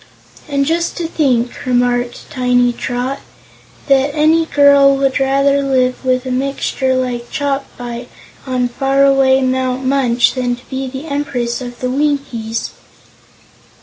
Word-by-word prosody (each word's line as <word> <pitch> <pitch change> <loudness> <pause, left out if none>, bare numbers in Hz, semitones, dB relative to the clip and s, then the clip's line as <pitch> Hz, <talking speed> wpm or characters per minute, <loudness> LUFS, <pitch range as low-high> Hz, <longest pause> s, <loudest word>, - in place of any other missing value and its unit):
"And 280 -1 +1
just 335 +3 -1
to 345 - -2
think," 255 -7 0
remarked 245 -1 0
Tiny 245 -1 +2
Trot, 250 +3 -3 0.7
"that 275 +1 +2
any 320 +2 +3
girl 280 -1 +5
would 270 0 +1
rather 275 +1 +2
live 255 -2 0
with 255 0 0
a 255 - -3
mixture 265 0 -1
like 245 -2 -3
Chopfyt, 250 -4 -4 0.4
on 250 -1 0
far 270 +2 +1
away 270 -1 +4
Mount 260 0 -1
Munch, 255 -3 +2
than 245 -2 -1
to 245 - -18
be 265 0 -3
the 265 +3 -7
Empress 270 -5 -3
of 245 -1 -8
the 255 - -1
Winkies!" 265 -6 -2
265 Hz, 135 wpm, -16 LUFS, 245-275 Hz, 0.7 s, girl